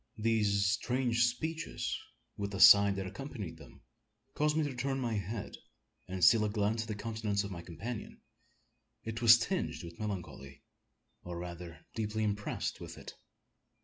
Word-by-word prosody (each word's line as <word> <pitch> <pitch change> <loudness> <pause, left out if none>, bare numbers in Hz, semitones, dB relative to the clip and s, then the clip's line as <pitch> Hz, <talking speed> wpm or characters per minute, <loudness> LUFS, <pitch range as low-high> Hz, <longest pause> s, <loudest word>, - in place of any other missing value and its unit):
These 105 -3 +2
strange 120 +3 +2
speeches, 160 +7 -2 0.4
with 100 0 -3
the 100 -1 -5
sigh 100 +1 +9
that 95 -1 -2
accompanied 105 - -7
them, - - -15 0.5
caused 150 +1 +1
me 160 - +3
to 145 -2 -2
turn 135 +2 -2
my 120 -3 -1
head, 105 +1 -4 0.5
and 90 -1 -4
steal 110 +2 +6
a 105 - +1
glance 105 +1 0
at 110 - -6
the 110 - -3
countenance 105 -1 -2
of 100 - -6
my 85 -2 -6
companion. 100 +8 -7 0.8
It 110 +1 -5
was 115 -1 +9
tinged 185 - -2
with 85 0 -10
melancholy, 90 -9 -6 0.6
or 90 -1 -6
rather 85 -1 -8
deeply 110 0 -2
impressed 105 -1 -2
with - - -8
it. - - -9
105 Hz, 155 wpm, -32 LUFS, 100-115 Hz, 0.8 s, sigh